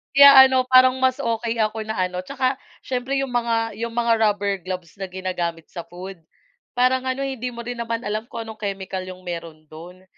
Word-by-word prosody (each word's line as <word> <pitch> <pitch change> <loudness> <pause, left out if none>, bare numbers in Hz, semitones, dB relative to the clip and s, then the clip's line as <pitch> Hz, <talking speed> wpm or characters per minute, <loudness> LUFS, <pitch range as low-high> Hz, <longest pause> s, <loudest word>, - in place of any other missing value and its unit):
kaya 275 -1 +10
ano, 260 -1 +2
parang 255 0 +6
mas 260 +1 +1
okey 230 -1 -2
ako 215 0 -1
na 220 0 -4
ano, 180 0 -2
'tsaka, 260 +4 -1 0.3
siyempre, 260 +2 -2
'yong 270 - -3
mga 230 -2 -1
'yong 230 0 -4
mga 235 0 +2
rubber 205 -2 +1
gloves 180 -2 -6
na 195 - -3
ginagamit 180 -3 -4
sa 170 - -7
food, 185 +2 -9 0.6
parang 255 +1 +2
ano 260 +1 -2
eh, 270 -1 -3
hindi 250 +2 -3
mo 235 - -7
rin 245 +1 -6
naman 230 0 -3
alam 215 +2 -3
kung 230 -1 -6
anong 220 -1 -9
chemical 195 -2 -4
'yung 185 0 -10
meron 165 -3 -7
do'n. 175 +4 -12
225 Hz, 200 wpm, -22 LUFS, 185-250 Hz, 0.6 s, kaya